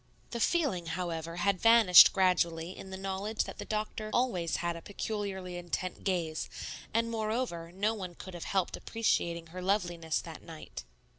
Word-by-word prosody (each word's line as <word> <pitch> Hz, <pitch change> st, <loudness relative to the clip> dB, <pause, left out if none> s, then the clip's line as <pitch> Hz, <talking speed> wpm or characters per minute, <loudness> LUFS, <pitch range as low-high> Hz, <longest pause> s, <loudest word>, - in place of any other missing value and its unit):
The 235 Hz, -, -3 dB
feeling, 230 Hz, -, +1 dB
however, 165 Hz, -1 st, -3 dB
had 185 Hz, +1 st, +1 dB
vanished 225 Hz, -6 st, +9 dB
gradually 180 Hz, -2 st, +1 dB
in 190 Hz, -, -9 dB
the 190 Hz, -, -6 dB
knowledge 195 Hz, +3 st, -2 dB
that -, -, -9 dB
the -, -, -5 dB
doctor 215 Hz, 0 st, -3 dB
always 185 Hz, -, +1 dB
had 170 Hz, -1 st, -1 dB
a 170 Hz, -, -8 dB
peculiarly 195 Hz, -2 st, -4 dB
intent 175 Hz, +1 st, -4 dB
gaze, 170 Hz, -5 st, -1 dB, 0.4 s
and, 230 Hz, +1 st, +1 dB
moreover, 215 Hz, -6 st, -2 dB
no 205 Hz, +5 st, 0 dB
one 185 Hz, -5 st, -6 dB
could 185 Hz, -, -9 dB
have 175 Hz, -, -6 dB
helped 190 Hz, -3 st, 0 dB
appreciating 170 Hz, -7 st, -1 dB
her 185 Hz, -, -5 dB
loveliness 175 Hz, -4 st, 0 dB
that 165 Hz, -2 st, -9 dB
night. 160 Hz, -, -9 dB
185 Hz, 160 wpm, -31 LUFS, 170-215 Hz, 0.4 s, vanished